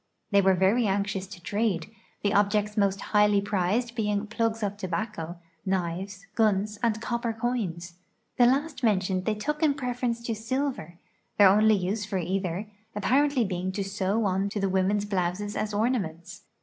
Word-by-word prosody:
They 200 -1 +5
were 190 -1 +4
very 200 +6 +3
anxious 195 -1 -1
to 190 -1 -10
trade, 205 -1 -1 0.3
the 205 - +2
objects 210 +1 +2
mo.st 200 -2 +2
highly 210 -1 +5
prized 205 +4 0
being 210 -2 -1
plugs 225 0 -1
of 205 0 -1
tobacco, 185 -3 -4 0.3
knives, 190 +1 -3
guns, 210 -1 +1
and 225 -2 +1
copper 235 0 -2
c(jins. 210 -8 -3 0.4
The 245 -2 +6
last 280 +4 0
men 210 -5 +4
tioned 185 0 -2
they 215 - +1
took 300 +8 -3
in 300 -3 +3
preference 245 -3 -2
to 235 - -2
silver, 225 - -3 0.4
their 200 -2 +8
only 215 +2 +5
use 200 +3 -1
for 200 -1 -3
either 185 +1 -2 0.3
apparently 260 +2 +2
l)eing 185 0 -2
to 200 - -1
sew 195 +2 -1
on 195 +1 +1
to 205 0 -3
the 195 -1 +1
women's 190 +2 +1
blouses 195 +1 -2
as 215 - -2
ornaments. 205 -7 -2
205 Hz, 165 wpm, -27 LUFS, 190-225 Hz, 0.4 s, their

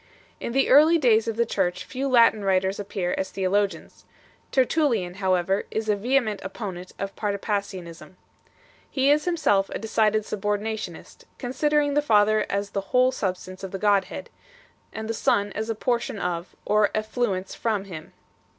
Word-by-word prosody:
In 235 - -4
the 270 +1 +3
early 310 +5 +7
days 230 -6 +3
of 225 - -1
the 235 +1 +2
Church 180 -4 -1
few 265 +5 -3
Latin 230 -4 +4
writers 190 0 +1
appear 190 -3 -2
as 190 - -2
theologians. 195 -2 -1 0.5
Tertullian, 250 - +1
however, 190 0 +1
is 220 0 -3
a 210 - +4
vehement 230 -1 0
opponent 190 -2 -6
of 195 0 -5
Patripassianism. 200 -5 -4 0.7
He 275 +1 +2
is 300 +1 +2
himself 295 - +2
a - - -4
decided 215 0 +1
subordinationist, 210 +1 -4
considering 290 +3 +1
the 295 - +3
Father 215 -5 +3
as 200 0 -2
the 195 - -2
whole 250 +6 +3
sub 190 -7 -2
stance 185 +1 -11
of 190 - -4
the 195 - -5
Godhead, 200 -1 0 0.6
and 220 0 -6
the 225 - -1
Son 205 -2 +1
as 220 +3 -4
a 225 - -1
portion 235 -1 -1
of, 175 -1 -4
or 210 -1 +3
effluence 215 -3 -2
from, 215 -4 -1
Him 170 -6 -8
1. - - -23
210 Hz, 160 wpm, -25 LUFS, 190-235 Hz, 0.7 s, early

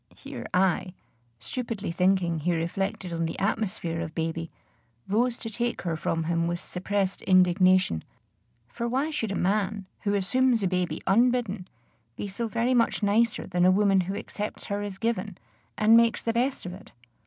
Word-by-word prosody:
Here - - -8
I, 185 0 +1 0.4
stupidly 215 - -4
thinking 180 -1 +2
he 175 +3 0
reflected 180 +2 -2
on 165 0 -1
the - - -5
atmosphere 190 -5 -1
of 160 -2 -6
baby, 165 0 -2 0.6
rose 235 +4 +1
to - - -6
take 235 +2 -2
her 170 -2 -1
from 165 +1 -1
him 165 +1 0
with 175 0 -2
suppressed 195 +1 -2
indignation; 185 - +4 0.6
for 235 - -4
why 270 +6 0
should 225 -9 -2
a - - -2
man, 200 +1 0
who 205 -1 0
assumes 235 +3 +2
a - - +3
baby 180 -1 -1
unbidden, 220 -2 +2 0.5
be - - -5
so 205 +4 -3
very 235 +3 +1
much 230 -2 +2
nicer 215 +3 +2
than 175 -1 0
a 180 - +6
woman 195 0 +4
who 195 - -2
accepts 210 0 -5
her 205 - -1
as 205 -2 -5
given, 210 -4 -2 0.4
and 215 +1 +6
makes 230 0 +4
the 230 - 0
best 250 0 0
of 180 - -5
it? 185 - -13
195 Hz, 170 wpm, -27 LUFS, 180-225 Hz, 0.6 s, a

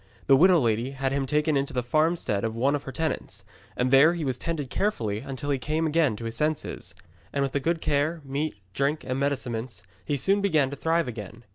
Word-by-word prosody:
The 135 - +6
widow 180 +5 +6
lady 120 -1 0
had 135 0 -1
him 135 -1 -1
taken 150 +2 +1
into 140 0 -1
the 125 - -1
farmstead 155 -6 +1
of 110 0 -2
one 135 +5 +2
of 145 - -1
her 135 - -5
tenants, 160 +2 -4 0.3
and 125 +1 +1
there 145 +6 +6
he 165 -3 -3
was 130 -2 -2
tended 155 -6 -3
carefully 110 - -1
until 135 +2 -4
he 135 - 0
came 155 +4 -1
again 155 -6 +2
to 115 - -7
his 115 0 -4
senses. 150 +4 -3 0.4
And 140 - 0
with 135 - -1
the 140 - 0
good 165 +3 -1
care, 155 +2 0
meat, 140 +2 -2 0.2
drink, 140 +5 0
and 130 +1 -2
medicaments, 125 -5 -2 0.2
he 145 - -1
soon 195 +9 +2
began 155 -9 +2
to - - -4
thrive 165 +2 +1
again. 115 0 -7
140 Hz, 220 wpm, -26 LUFS, 125-155 Hz, 0.4 s, The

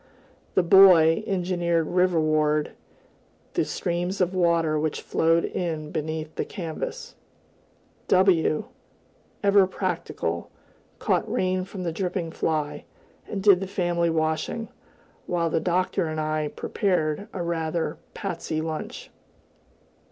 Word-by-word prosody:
The 185 - +4
Boy 175 -1 +7
engineered 175 -3 0
riverward 155 -4 +2 0.8
the - - +2
streams 175 +2 -2
of 180 0 +1
water 170 -4 +2
which 155 0 -2
flowed 165 +1 +2
in 160 -4 -3
beneath 155 0 -4
the - - -2
canvas; 445 - -6 0.9
W, 180 -5 +3 0.8
ever 200 -1 +5
practical, 165 - -3 0.5
caught - - 0
rain 185 0 0
from 190 -1 -7
the 170 - -1
dripping 180 -2 -2
fly, 155 -2 -2 0.4
and 195 -2 -4
did 195 -3 +6
the 195 - -4
family 175 -2 0
washing, 160 +8 -1 0.6
while 170 -2 0
the - - +2
Doctor 180 +1 0
and 155 0 -3
I 155 0 -1
prepared 180 +1 -1
a 180 - -4
rather 165 -1 -2 0.2
pasty 170 -5 -3
lunch. 155 -1 -5
170 Hz, 115 wpm, -25 LUFS, 155-185 Hz, 0.9 s, Boy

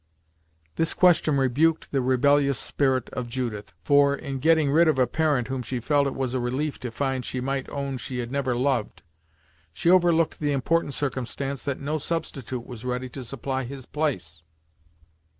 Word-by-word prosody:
This 165 - +1
question 165 -5 +4
rebuked 140 +5 +2
the 135 - +1
rebellious 140 +2 +3
spirit 130 +1 0
of 125 -1 -4
Judith, 115 -5 -4
for, 140 -1 +4
in 140 -2 -5
getting 160 0 +3
rid 165 +3 +5
of 155 - +3
a 130 - +4
parent 145 -1 0
whom 130 -1 -3
she 125 0 -3
felt 145 +3 +2
it 135 - -4
was 130 -2 -2
a 130 - 0
relief 130 +5 -2
to 125 - -5
find 130 +2 -2
she 130 - -4
might 135 +1 -2
own 140 -2 -4
she 125 +1 -5
had 120 -1 -4
never 135 -3 0
loved, 125 -3 -1 0.7
she 170 - +2
overlooked 170 -3 +3
the 145 -1 0
important 145 +1 0
circumstance 135 0 -3
that 140 -2 -2
no 150 +3 -2
substitute 135 -6 -4
was 120 -2 -9
ready 125 0 -3
to 130 +1 -8
supply 135 +2 -3
his 130 0 -8
place. 90 - -2
135 Hz, 175 wpm, -25 LUFS, 125-145 Hz, 0.7 s, rid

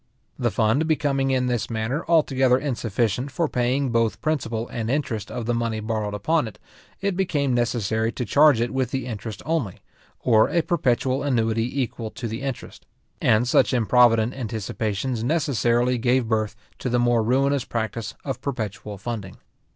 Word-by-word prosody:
The 120 -2 +2
fund 115 +8 +1
becoming 140 -4 +1
in 130 -1 +1
this 120 -3 -1
manner 115 +7 -2
altogether 135 -6 +3
insufficient 120 -2 -1
for 160 +5 0
paying 125 +1 0
both 115 -2 +1
principal 120 -5 -2
and 115 -1 -3
interest 120 -7 -2
of 120 - -4
the 120 - 0
money 115 -2 -1
borrowed 110 -1 -2
upon 155 +6 +1
it, 110 - -10 0.4
it 200 -1 0
became 150 -8 0
necessary 115 -2 0
to 125 - -3
charge 145 +3 +5
it 120 +1 0
with 130 -2 0
the 135 -1 -3
interest 110 -3 -6
only, 150 - -1 0.4
or 110 -3 +4
a 170 - +1
perpetual 130 -5 +1
annuity 120 -1 0
equal 115 -2 -5
to 115 - -6
the 115 +3 -5
interest; 135 -3 -6 0.3
and 110 +3 +3
such 125 - +3
improvident 120 0 +4
anticipations 110 0 -3
necessarily 125 -4 +1
gave 125 0 +2
birth 110 -1 0 0.2
to 125 - -2
the 125 - +2
more 120 -1 +3
ruinous 135 +4 +2
practice 115 -1 -4
of 135 -3 -4
perpetual 105 -6 -4
funding. 100 -2 -6
120 Hz, 160 wpm, -24 LUFS, 110-135 Hz, 0.4 s, charge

